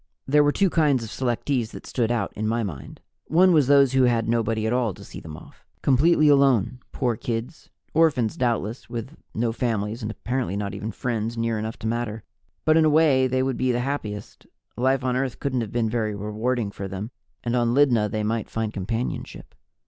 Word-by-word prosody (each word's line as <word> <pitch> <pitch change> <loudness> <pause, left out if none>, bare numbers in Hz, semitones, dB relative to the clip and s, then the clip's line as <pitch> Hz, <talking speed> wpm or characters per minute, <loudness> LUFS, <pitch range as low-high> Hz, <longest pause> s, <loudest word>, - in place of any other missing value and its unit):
There 145 +2 +4
were 145 - +3
two 195 +3 +2
kinds 145 -7 +2
of 110 - -7
selectees 125 -1 -1
that - - -9
stood 120 -2 -1
out, 115 -5 -1
in 110 +1 -3
my 115 +1 0
mind. 75 -10 -7 0.3
One 180 +3 +5
was 150 -5 +4
those 140 -2 +5
who 130 -1 +4
had 115 -2 +1
nobody 115 -1 0
at 110 - +1
all 120 -6 0
to - - -12
see - - -9
them 75 -1 -9
off. - - -16 0.2
Completely 155 +4 +4
alone, 135 -5 +4
poor 120 -3 0
kids 115 +7 -5 0.2
orphans, 145 -9 +2
doubtless, 120 -2 -2
with 120 +5 -6 0.2
no 115 +1 0
families 115 -1 -2
and 105 - -3
apparently 120 -2 -3
not 100 -1 -3
even 105 +2 -4
friends 115 -1 -3
near 115 -1 0
enough 110 +1 -4
to - - -9
matter. 115 -2 -2 0.4
But, 155 0 +5
in 160 - +5
a - - +5
way, 145 -4 +4
they 130 0 +1
would 130 -1 -1
be 130 0 +1
the 120 0 0
happiest; 110 -7 -5 0.3
life 130 +2 +1
on 125 -1 0
Earth 130 -1 -2
couldn't 130 -3 -1
have 110 - -5
been 120 -2 0
very 110 -2 -1
rewarding 105 +2 -2
for 100 -1 -6
them, 100 +4 -6 0.3
and 120 0 -1
on 120 0 +2
Lydna 120 -7 +4
they 110 +1 -2
might 110 0 -2
find 110 -1 -3
companionship. 115 +5 -4
120 Hz, 205 wpm, -24 LUFS, 110-130 Hz, 0.4 s, One